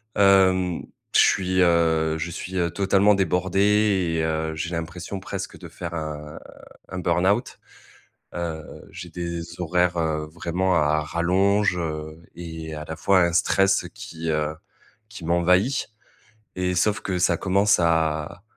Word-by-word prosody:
hem, 95 -3 +4 0.3
je - - +7
suis, 95 0 +3
heu, 80 -2 +2
je 80 +2 -4
suis 90 +2 -7
je 95 - -2
suis 85 -1 -2
totalement 100 +1 +3
débordé 95 0 +2
et - - 0
heu, 80 0 -1
j'ai 85 +2 -4
l'impression 85 +3 -5
presque - - -6
de - - -9
faire 85 -1 -7
un 75 -2 -6 0.5
un 95 - -5
burn-out. 90 +7 +1 0.8
Heu, 80 -3 -6
j'ai 90 - -9
des 85 0 -6
horaires 90 0 +1 0.3
vraiment 85 +3 -1
à 75 -1 +3
à - - +1
rallonge, 90 +5 +1
heu 80 -1 -5
et 80 -2 -7
à 75 0 -6
la 80 - -6
fois 95 +2 +3
un 85 0 +2
stress 95 +2 +2
qui, 95 -7 -7
heu, 75 0 -1 0.5
qui 105 -6 -10
m'envahit. 90 - +2 0.7
Et 90 0 -1
sauf 105 +4 +1
que 95 -2 -2
ça 85 -1 +2
commence 100 +3 +2
à 80 0 0
85 Hz, 145 wpm, -24 LUFS, 80-95 Hz, 0.8 s, je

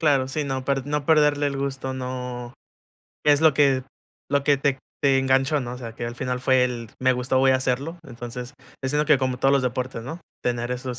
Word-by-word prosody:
Claro, 140 -5 +3
sí, 150 +2 -2
no 135 -1 -3
per 135 0 -1
no 150 -1 -1
perderle 150 -2 +4
el 140 - -4
gusto, 135 -1 -3
no 125 -1 -5 0.7
es 145 -1 +5
lo 160 -3 +5
que 135 -3 +3 0.5
lo 140 -1 +2
que 145 -1 +4
te 135 -1 +1 0.2
te 135 -1 +4
enganchó, 135 +2 +2
¿no?, 120 -1 -5
o - - -9
sea, 115 -3 -7
que 120 - -5
al 120 0 -5
final 125 -1 -2
fue 130 0 +4
el: 120 -3 -4
"Me 130 0 +3
gustó, 125 +1 0
voy 135 0 +5
a - - +3
hacerlo". 135 +7 -1
Entonces, 120 +2 -7 0.3
es 130 +1 0
algo 150 +1 +1
que 150 -3 +6
como 130 -1 -1
todos 135 +2 +3
los 140 -2 +3
deportes, 125 -1 -2
¿no?, 160 +8 -7 0.2
tener 120 0 -1
esos 125 -1 -5
130 Hz, 225 wpm, -24 LUFS, 125-140 Hz, 0.7 s, que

